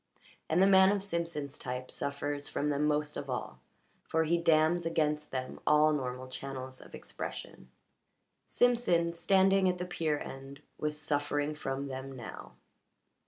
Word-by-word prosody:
And 175 +4 +4
the - - +7
man 190 0 +7
of 200 -1 0
Simpson's 165 -6 -3
type 125 0 -5
suffers 145 0 -3
from 150 - -1
them 145 +1 +1
most 150 0 0
of 140 - -6
all, 100 - -4 0.4
for 160 0 0
he 165 +2 +2
dams 165 +1 +3
against 150 -2 0
them 130 -1 -4
all 150 +1 +5
normal 130 -2 -3
channels 130 0 -7
of - - -11
expression. 65 - -7 0.8
Simpson, 230 -9 +2
standing 190 +2 +4
at 180 - -1
the 180 - -3
pier 160 -4 -1
end, 135 +1 -9 0.2
was 150 0 -1
suffering 145 0 0
from 135 -2 -3
them 135 0 -6
now. 120 -3 -9
150 Hz, 150 wpm, -31 LUFS, 135-170 Hz, 0.8 s, the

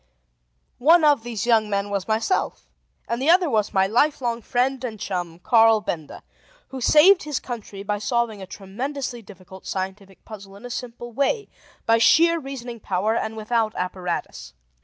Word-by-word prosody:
One 320 +6 +5
of 290 -5 +4
these 230 -1 -4
young 225 -3 +3
men 200 0 -1
was 200 -2 -2
myself, 225 - -1 0.4
and 235 +2 -2
the 280 - +1
other 350 -3 +4
was 215 -2 +1
my 190 -1 +3
lifelong 240 +1 +1
friend 255 +3 -1
and 225 -4 -5
chum, 175 -4 -4
Carl 225 +3 +4
Benda, 165 -8 -6 0.5
who 265 -1 -7
saved 350 +9 +6
his 300 -2 -3
country 210 -5 -7
by 205 0 -2
solving 220 -1 -1
a 190 - -8
tremendously 240 +7 -5
difficult 190 -2 -14
scientific 190 0 -6
puzzle 200 -3 -11
in 205 - -12
a 245 - -7
simple 240 0 -6
way, 280 - -1 0.4
by 230 0 +4
sheer 335 +7 +5
reasoning 255 -4 -7
power, 200 +3 -1
and 220 -1 -3
without 220 0 -1
apparatus. 180 0 -4
225 Hz, 160 wpm, -23 LUFS, 200-255 Hz, 0.5 s, saved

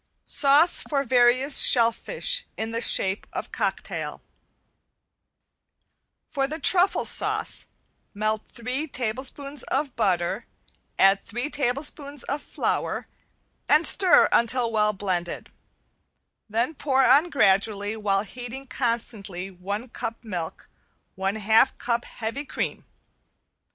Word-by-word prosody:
~SAUCE 290 +4 +5
FOR 280 -2 0
VARIOUS 255 +2 +5
SHELLFISH 480 - +2
IN 220 +1 -4
THE 230 0 -3
SHAPE 190 -3 +1
OF - - -6
COCKTAIL~ - - -4 2.0
For 270 -2 -2
the 310 +3 -6
truffle 365 +3 +4
sauce - - +2 0.5
melt 215 +1 -1
three 255 +6 -5
tablespoons 265 +3 -3
of 275 0 -3
butter, 190 -1 -1 0.5
add 195 +1 +4
three 240 +6 -5
tablespoons 280 +1 -3
of 285 +2 -4
flour, - - -3 0.6
and 305 +3 +4
stir 375 -3 +6
until 235 0 +2
well 210 -1 +2
blended, 185 -4 -4 1.0
then 230 +8 -1
pour 270 -3 +1
on 285 +8 +4
gradually 205 - +1
while 200 -2 0
heating 245 +4 -8
constantly 220 -7 -3
one 200 +6 -6
cup 230 -1 -7
milk 180 -7 -6
and - - -43
one 195 +2 -3
half 220 +5 +2
cup 235 -1 -2
heavy 230 +5 -6
cream. - - -5
240 Hz, 110 wpm, -24 LUFS, 210-275 Hz, 2.0 s, stir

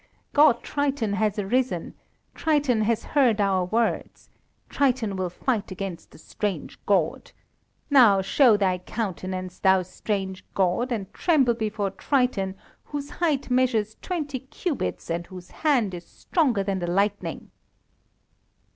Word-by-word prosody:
God 290 -5 +5
Triton 280 -7 -1
has 210 +1 0
arisen! 205 -2 -1 0.4
Triton 290 -7 +1
has 220 +1 +1
heard 250 -7 +2
our 190 -3 +2
words. 225 +5 -2 0.4
Triton 245 -7 0
will 185 -1 -2
fight 215 +4 -2
against 185 -2 -6
the - - -16
strange 185 0 -5
God. 185 -6 +1 0.6
Now, 235 -8 +7
show 230 +2 +5
thy 185 -3 +1
countenance, 185 -2 -4
thou 190 -1 +4
strange 190 +1 -4
God, 195 +7 +1
and 205 -5 -3
tremble 280 -9 +3
before 215 -3 -2
Triton, 225 -6 0 0.3
whose 290 -1 -6
height 290 -6 -1
measures 235 -4 +1
twenty 295 -7 -3
cubits, 280 - -4
and 170 +1 -3
whose 185 -1 -11
hand 255 -11 +1
is 175 -1 -8
stronger 260 - 0
than 195 -1 -1
the 175 - -3
lightning." 200 +3 -1
215 Hz, 130 wpm, -25 LUFS, 190-260 Hz, 0.6 s, Now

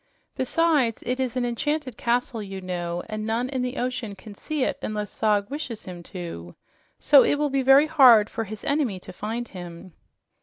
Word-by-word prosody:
Besides, 275 -3 +1
it 250 +1 -2
is 260 -1 -1
an 250 - 0
enchanted 275 +1 -2
castle, 240 0 -1
you 195 -2 -6
know, 175 -1 -4
and 215 -1 -4
none 230 +3 -1
in 260 -2 -2
the 250 +2 -3
ocean 245 -4 -3
can 205 +2 -12
see 295 +6 -3
it - - -1
unless 210 -1 -4
Zog 210 +1 +1
wishes 280 -7 -5
him 180 -2 -8
to. 125 - -7 0.4
So 285 -2 +6
it - - +3
will 290 -1 -1
be 275 0 +1
very 270 +3 +6
hard 255 -9 +7
for 225 - -4
his 215 +1 -8
enemy 280 -10 0
to 180 - -11
find 225 +5 -4
him." 175 -1 -10
235 Hz, 190 wpm, -25 LUFS, 200-265 Hz, 0.4 s, hard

